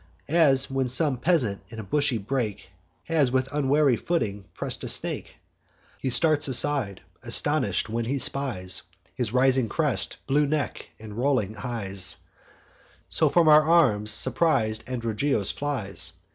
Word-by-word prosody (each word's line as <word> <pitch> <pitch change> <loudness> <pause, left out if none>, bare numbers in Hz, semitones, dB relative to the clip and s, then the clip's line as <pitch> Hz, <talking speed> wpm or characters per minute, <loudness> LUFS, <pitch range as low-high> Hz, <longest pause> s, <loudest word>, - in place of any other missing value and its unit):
As 145 -5 +4
when 135 -1 -1
some 130 +2 +1
peasant, 125 - 0
in 115 - -11
a - - -5
bushy 140 +4 0
brake, 110 -3 -4 0.3
Has 150 -6 +1
with 130 +1 -1
unwary 145 -2 +2
footing 105 - -2
press'd - - -4
a - - -4
snake; - - -2 0.6
He 130 - -2
starts 155 +3 +3
aside, 130 -6 0 0.2
astonish'd, 120 -3 +1
when 115 +1 -3
he 135 +4 -1
spies 120 -10 -1 0.3
His 120 -4 -3
rising 130 -1 +3
crest, 145 -11 0
blue 145 +2 +2
neck, 150 -1 -3
and 110 -1 -10
rolling 125 -6 0
eyes; 100 -4 +1 0.9
So - - +2
from 170 -2 +3
our 155 0 +8
arms 135 -11 +2
surpris'd 110 -2 0
Androgeos 115 -2 -1
flies. 135 -9 -3
130 Hz, 135 wpm, -25 LUFS, 110-145 Hz, 0.9 s, our